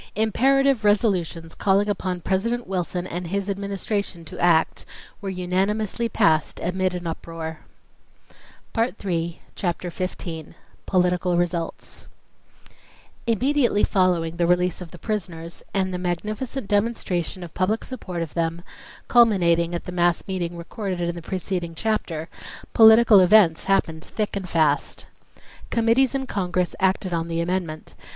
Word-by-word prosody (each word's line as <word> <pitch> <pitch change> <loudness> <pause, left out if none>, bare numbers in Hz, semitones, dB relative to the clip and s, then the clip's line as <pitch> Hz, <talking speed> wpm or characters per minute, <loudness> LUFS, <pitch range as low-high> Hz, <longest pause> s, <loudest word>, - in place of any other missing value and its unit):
Imperative 265 +4 +3
resolutions 185 -6 +1
calling 200 +1 +2
upon 185 -3 -2
President 230 +7 -1
Wilson 180 -1 -2
and 175 -1 -5
his 200 +2 -2
Administration 200 -2 -3
to - - -9
act, 165 -2 +3 0.4
were 200 - -4
unanimously 195 +5 -1
passed 160 -8 +2
amid 185 +1 0
an 175 -1 -5
uproar. 165 -1 -5 2.0
Chapter 175 -1 -2
15 170 -3 -5 0.3
Political 180 -1 +2
Results 175 -1 -3 1.2
Immediately 245 -1 +2
following 175 -3 +1
the 170 0 +2
release 180 0 +1
of 175 - -7
the 175 - -12
prisoners 170 -5 -4
and 190 -1 0
the 180 - -2
magnificent 210 +8 -3
demonstration 205 -5 -1
of 170 - -9
public 205 +5 0
support 185 -9 -5
of 160 - -8
them, 165 0 -2 0.4
culminating 175 -8 +4
at 170 - -4
the - - -7
mass 175 -1 +2
meeting 175 -3 -3
recorded 185 +2 -4
in 170 0 -1
the 170 - -7
preceding 180 -1 -3
chapter, 165 -6 -2 0.5
political 220 -1 +8
events 185 -3 +5
happened 165 -4 +1
thick 210 +1 -3
and 190 -2 -4
fast. 155 -3 +1 0.6
Committees 235 +4 +3
in 270 -1 -1
Congress 180 -5 -1
acted 190 -1 +1
on 165 0 -1
the 165 0 -2
amendment. 170 -2 -3
185 Hz, 130 wpm, -24 LUFS, 170-205 Hz, 2.0 s, political